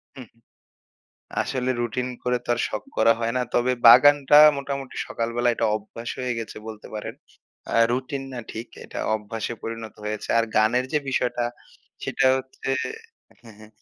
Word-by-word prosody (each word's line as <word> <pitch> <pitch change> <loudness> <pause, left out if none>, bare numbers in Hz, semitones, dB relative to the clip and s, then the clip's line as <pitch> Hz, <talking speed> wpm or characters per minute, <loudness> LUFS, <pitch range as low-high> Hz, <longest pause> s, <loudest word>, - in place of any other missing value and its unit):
হুম, 130 -3 -10 1.2
আসলে 130 -1 -2
রুটিন 125 +2 -2
করে 125 0 +1
তো - - -19
আর - - -6
শখ - - -4
করা 115 - +5
হয় 115 0 0
না। 125 - +2
তবে 125 +1 +3
বাগানটা 145 +4 +8 0.2
মোটামুটি 140 -1 -5
সকালবেলা 115 +1 -1
এটা 115 - 0
অভ্যাস 115 +2 -9
হয়ে 125 -1 -1
গেছে 115 - -7
বলতে 110 -1 -9
পারেন। 105 - -5 0.6
আ - - -1 0.2
রুটিন 130 +2 -2
না 120 - -5
ঠিক। 115 +2 -7 0.2
এটা - - -8 0.2
অভ্যাসে 110 +2 -4
পরিণত 115 -1 -6
হয়েছে। 105 0 -4
আর 115 - +3
গানের 115 +4 +3
যে, 150 - +3
বিষয়টা 125 -2 0 0.6
সেটা 135 - +1
হচ্ছে 130 0 -8 0.8
হ্যা, 115 - -13
হ্যা, 110 0 -14
120 Hz, 155 wpm, -24 LUFS, 115-130 Hz, 1.2 s, বাগানটা